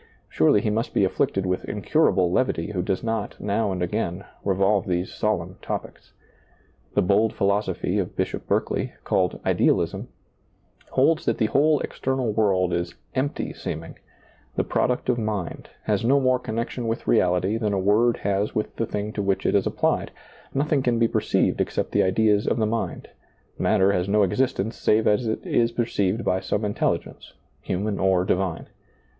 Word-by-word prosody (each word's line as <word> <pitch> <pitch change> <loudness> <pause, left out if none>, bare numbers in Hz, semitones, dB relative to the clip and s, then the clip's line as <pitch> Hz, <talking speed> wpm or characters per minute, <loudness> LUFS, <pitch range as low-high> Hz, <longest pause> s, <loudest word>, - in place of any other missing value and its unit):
Surely 80 +6 +3
he 105 - 0
must 115 +3 -2
be - - +4
afflicted 95 0 0
with 90 0 -1
incurable 100 - +2
levity 95 -5 0
who 95 -4 -1
does 95 +1 -2
not, 110 -2 -3
now 105 0 0
and 90 -1 -2
again, 90 0 -2 0.2
revolve 100 +1 +2
these 90 0 -1
solemn 95 -4 -2
topics. - - -6 0.8
The - - +4
bold 105 +4 +3
philosophy 100 +1 0
of - - -3
Bishop - - -3
Berkeley, - - -1
called 90 -2 0
Idealism, - - +1 0.8
holds 155 +5 +2
that - - +1
the 110 - +2
whole 145 +6 +3
external 130 -4 -2
world 95 -5 +2
is 85 0 -2
" - - -40
empty 145 - -4
seeming," - - -6 0.6
the - - +1
product 125 - 0
of 125 -1 +1
mind, 105 -5 -4
has 105 -1 0
no 135 +4 +4
more 130 -1 +2
connection 115 +1 -3
with 115 +1 -2
reality 90 0 +2
than 110 -2 -1
a 100 - 0
word 105 +5 +3
has 100 +1 0
with 105 - -2
the 115 - -1
thing 105 +1 -3
to 105 - -2
which 100 -1 0
it - - +2
is - - +2
applied, - - 0 0.4
nothing 140 +1 +1
can 120 -2 +1
be 115 0 +3
perceived - - +1
except - - -2
the - - +3
ideas 105 +2 +2
of - - +1
the 110 - +2
mind; 115 +2 -3 0.5
matter 95 +1 +3
has 90 0 -1
no 105 +1 +4
existence 110 +1 0
save 110 +1 +2
as 105 +3 +2
it 110 - -3
is 115 0 +2
perceived 115 -2 -1
by 95 - +1
some 105 +2 -2
intelligence, 105 - -2 0.3
human 100 +3 -2
or 95 -1 +2
divine. 95 -2 -1
105 Hz, 170 wpm, -24 LUFS, 95-115 Hz, 0.8 s, be